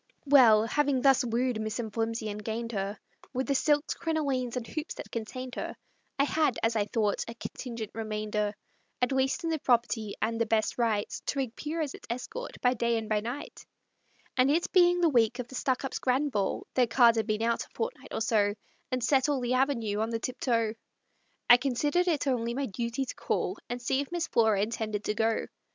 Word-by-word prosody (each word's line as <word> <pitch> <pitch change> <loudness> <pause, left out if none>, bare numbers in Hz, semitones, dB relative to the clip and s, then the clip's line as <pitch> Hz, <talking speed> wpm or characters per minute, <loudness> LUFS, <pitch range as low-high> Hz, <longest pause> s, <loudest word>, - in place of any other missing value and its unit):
Well, 240 -7 +7
having 285 +2 +1
thus 270 -2 +5
wooed 240 -1 0
Miss 215 +2 -3
M'Flimsey 225 0 -2
and 210 +1 -7
gained 230 +2 -3
her, 200 -1 -3 0.4
With 260 +1 -1
the 280 - +1
silks, 295 +2 +2
crinolines, 280 -7 -1
and 240 - -3
hoops 310 +6 -5
that - - -9
contained 250 +3 -5
her, - - -4 0.4
I 275 - +4
had, 300 -2 +1
as 225 0 +2
I 210 -2 +2
thought, 210 -2 0
a 230 - -7
contingent 230 -2 -6
remainder 210 -1 -2 0.4
At 250 +1 +1
least 265 +5 +1
in 330 - 0
the 320 - 0
property, 235 -4 +1
and 225 +1 -1
the 230 - +2
best 220 +2 0
right 220 -3 +1 0.2
To 280 - -1
appear 295 +6 -4
as 290 -3 -2
its - - -12
escort 455 - -5
by 250 0 +4
day 235 -1 +1
and 220 -1 -4
by 215 -1 +2
night; 240 +7 -6 0.7
And 255 +1 +4
it 325 +4 +1
being 355 -1 +5
the 340 - +5
week 235 -3 +3
of 250 -2 -4
the - - -13
Stuckups' 260 +1 -1
grand 270 +3 +1
ball 200 -5 -1
Their 250 -2 +3
cards 235 -1 +5
had 220 - 0
been 215 0 0
out 235 0 +1
a - - -16
fortnight 465 +2 -4
or - - -3
so, 210 -2 +2 0.3
And 255 -1 -1
set 265 +3 +3
all 285 -2 +1
the 245 0 -1
Avenue 245 -6 +1
on 220 +1 0
the 230 - -1
tiptoe 230 -2 0 0.7
I 245 - +9
considered 290 +7 +1
it 315 -5 +1
only 235 -3 0
my 275 +1 -1
duty 235 +4 -3
to - - -5
call, - - -2
And 245 +1 -3
see 265 +3 0
if 285 - -7
Miss 345 -1 -1
Flora 220 -4 +3
intended 215 -1 -3
to 210 - 0
go. 225 +1 +1
240 Hz, 205 wpm, -29 LUFS, 225-270 Hz, 0.7 s, I